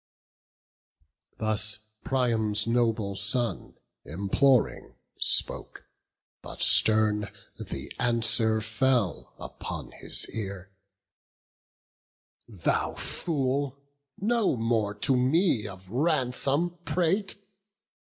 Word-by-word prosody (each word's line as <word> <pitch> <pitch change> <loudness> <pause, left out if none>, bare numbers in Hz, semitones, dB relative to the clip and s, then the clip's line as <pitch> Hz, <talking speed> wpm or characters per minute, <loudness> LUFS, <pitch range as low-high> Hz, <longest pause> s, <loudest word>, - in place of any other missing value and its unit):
Thus 110 -1 +2 0.3
Priam's 110 -5 +1
noble 115 -4 0
son, 110 +4 -1 0.3
imploring, 100 - 0 0.2
spoke; - - +1 0.6
But - - -10
stern 105 -2 +5 0.3
the - - -7
answer 115 -2 +2
fell 115 -2 -1
upon - - -8
his - - -1
ear: 100 -3 -6 1.8
"Thou 100 -8 -2
fool! 140 -3 -2 0.4
no 225 - 0
more 110 -3 -1
to 130 +6 0
me 130 - +1
of 95 -2 -11
ransom 145 - 0
prate! 185 +4 0
115 Hz, 75 wpm, -27 LUFS, 105-135 Hz, 1.8 s, stern